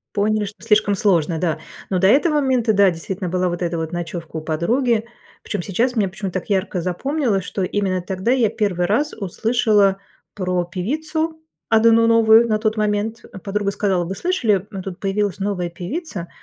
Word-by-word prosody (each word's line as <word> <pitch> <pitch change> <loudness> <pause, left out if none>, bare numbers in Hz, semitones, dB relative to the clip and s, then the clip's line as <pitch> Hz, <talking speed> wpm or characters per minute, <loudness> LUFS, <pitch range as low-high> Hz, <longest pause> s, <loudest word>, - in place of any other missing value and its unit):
Поняли, 215 +1 +1
что 200 - -11
слишком 210 -2 +3
сложно, 175 -5 +1
да. 165 -2 -1 0.3
Но 185 - +1
до 190 - +3
этого 295 - +4
момента, 260 -6 +2
да, 200 -2 +5
действительно, 180 +3 -5
была 180 +1 0
вот 175 +1 -4
эта 170 0 -1
вот 160 +1 -4
ночёвка 170 -1 -5
у - - -2
подруги. 220 - 0 0.4
Причём 205 -4 -3
сейчас 240 +7 0
мне 205 -3 +2
почему-то 190 -1 -4
так - - -19
ярко 190 -2 0
запомнилось, 205 - -1
что 195 - -3
именно 185 -1 0
тогда 190 +5 -2
я 245 -5 +3
1 195 -5 0
раз 290 +10 +1
услышала 205 -1 +1 0.4
про 180 -2 -1
певицу, 310 - -3 0.3
одну 230 +1 +5
новую, 230 0 +5
на 215 - +1
тот 215 0 0
момент. 210 +1 -1 0.2
Подруга 200 0 -1
сказала: 195 -3 0
"Вы 190 - -4
слышали, 220 - 0
м, 195 -2 -5
тут 185 -2 -7
появилась 200 -1 -1
новая 195 -3 -2
певица. 180 - -6
200 Hz, 175 wpm, -20 LUFS, 180-225 Hz, 0.4 s, да